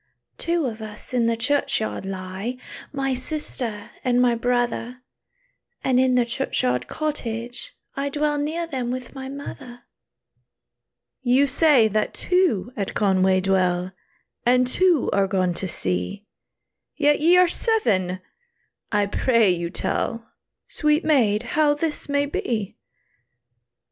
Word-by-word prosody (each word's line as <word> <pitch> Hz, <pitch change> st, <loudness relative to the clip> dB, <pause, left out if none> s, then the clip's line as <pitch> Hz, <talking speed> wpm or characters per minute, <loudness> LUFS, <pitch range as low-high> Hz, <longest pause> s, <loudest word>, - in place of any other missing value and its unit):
"Two 335 Hz, -2 st, 0 dB
of 225 Hz, -3 st, -4 dB
us 215 Hz, +3 st, -9 dB
in 240 Hz, -2 st, +2 dB
the 230 Hz, 0 st, +1 dB
churchyard 275 Hz, -5 st, 0 dB
lie, 190 Hz, +5 st, -5 dB, 0.3 s
My 270 Hz, -1 st, -1 dB
sister 255 Hz, -5 st, -5 dB
and 245 Hz, -1 st, +2 dB
my 250 Hz, -1 st, +4 dB
brother; 245 Hz, +1 st, -1 dB, 0.8 s
And 255 Hz, -1 st, +3 dB
in 255 Hz, -1 st, +3 dB
the 245 Hz, -1 st, +3 dB
churchyard 180 Hz, -, 0 dB
cottage, 245 Hz, -, -4 dB, 0.2 s
I 280 Hz, +1 st, -2 dB
Dwell 295 Hz, +1 st, 0 dB
near 320 Hz, +4 st, -2 dB
them 260 Hz, -7 st, -3 dB
with 255 Hz, 0 st, -5 dB
my 265 Hz, -1 st, -7 dB
mother." 255 Hz, -3 st, -9 dB, 1.4 s
"You 260 Hz, +2 st, +4 dB
say 280 Hz, -4 st, +4 dB
that 215 Hz, +1 st, -1 dB
two 355 Hz, -, +1 dB
at 200 Hz, -3 st, -3 dB
Conway 190 Hz, -2 st, +3 dB
dwell, 185 Hz, -1 st, +1 dB, 0.5 s
And 250 Hz, +1 st, +4 dB
two 340 Hz, +3 st, +2 dB
are 195 Hz, -1 st, +2 dB
gone 185 Hz, -2 st, +1 dB
to 190 Hz, -, -4 dB
sea, 90 Hz, -, -2 dB, 0.7 s
Yet 295 Hz, -1 st, +3 dB
ye 340 Hz, +4 st, +5 dB
are 360 Hz, 0 st, +6 dB
seven! 200 Hz, -, 0 dB, 0.7 s
I 205 Hz, -2 st, +2 dB
pray 225 Hz, 0 st, +3 dB
you 170 Hz, -1 st, -2 dB
tell, 230 Hz, +5 st, -3 dB, 0.4 s
Sweet 300 Hz, +1 st, +1 dB
maid, 235 Hz, -8 st, +3 dB
how 300 Hz, -1 st, +3 dB
this 300 Hz, -1 st, -3 dB
may 285 Hz, 0 st, +2 dB
be." 225 Hz, -7 st, -3 dB
245 Hz, 130 wpm, -23 LUFS, 205-285 Hz, 1.4 s, are